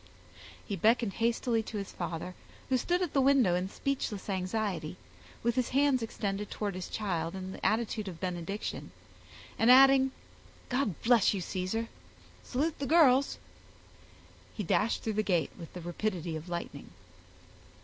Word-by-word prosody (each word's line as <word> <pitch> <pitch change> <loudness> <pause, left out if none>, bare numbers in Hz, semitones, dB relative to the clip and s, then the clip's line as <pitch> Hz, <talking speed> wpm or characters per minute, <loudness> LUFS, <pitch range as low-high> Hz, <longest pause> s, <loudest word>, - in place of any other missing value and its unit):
He 200 - -3
beckoned 220 +2 +2
hastily 230 0 +1
to 220 -1 -6
his 200 -1 -5
father, 170 +2 -5 0.4
who 260 - +3
stood 355 +8 0
at 345 - -3
the 275 - +4
window 265 -9 +4
in 180 +2 -1
speechless 215 -7 -3
anxiety, 185 -3 -2 0.5
with 235 0 +2
his 250 0 0
hands 275 -1 +3
extended 205 -2 -3
towards 205 -2 -3
his 185 0 -5
child 175 -5 -2
in 190 0 -5
the - - -10
attitude 215 -1 0
of 175 -3 -7
benediction, 180 +2 -4 0.7
and 225 - +4
adding, 265 +1 +7 0.6
"God 250 - 0
bless 230 -4 +4
you, 190 - -2
Caesar, 185 +6 -2 0.5
salute 300 +5 -2
the 280 - -2
girls," 280 -4 +5 1.2
he 210 - -3
dashed 210 +5 +1
through 220 - -1
the 215 - +1
gate 180 -6 0
with 165 - -9
the 180 - -7
rapidity 175 -1 -3
of 160 +3 -7
lightning. 170 -4 -5
215 Hz, 150 wpm, -30 LUFS, 185-250 Hz, 1.2 s, adding